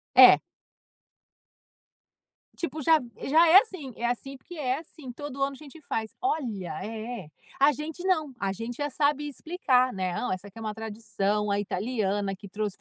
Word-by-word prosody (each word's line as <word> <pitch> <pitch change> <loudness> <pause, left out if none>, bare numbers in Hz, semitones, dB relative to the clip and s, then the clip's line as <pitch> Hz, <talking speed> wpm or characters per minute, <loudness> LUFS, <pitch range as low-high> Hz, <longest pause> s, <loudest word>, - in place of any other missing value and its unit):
É. - - +10 2.2
Tipo, 315 -3 -4
já 320 +2 +5 0.3
já 320 +5 +6
é 340 +4 +9
assim 315 - -8
é 235 - -3
assim, 270 +3 -3
porque 350 +6 -12
é 265 -3 0
assim, 305 -5 -10
todo 275 +1 -7
ano 275 0 +1
a - - -9
gente 305 +1 -12
faz 220 -5 -3
olha, 240 - -1
é, 220 -5 -6 0.3
a 285 +2 +6
gente 310 +5 -6
não, 315 -7 +1
a 195 -1 0
gente 230 +5 -5
já 290 0 -1
sabe 295 +1 +1
explicar, 265 -5 +1
né. 185 -2 -2
"Não, 250 - -2
essa 185 +2 -6
aqui 200 +3 -15
é - - -7
uma 215 -1 -3
tradição, 210 -2 -2
a 200 - +2
italiana 205 -1 -1
que 200 +1 -11
trouxe, 210 -1 -3
250 Hz, 175 wpm, -27 LUFS, 210-295 Hz, 2.2 s, É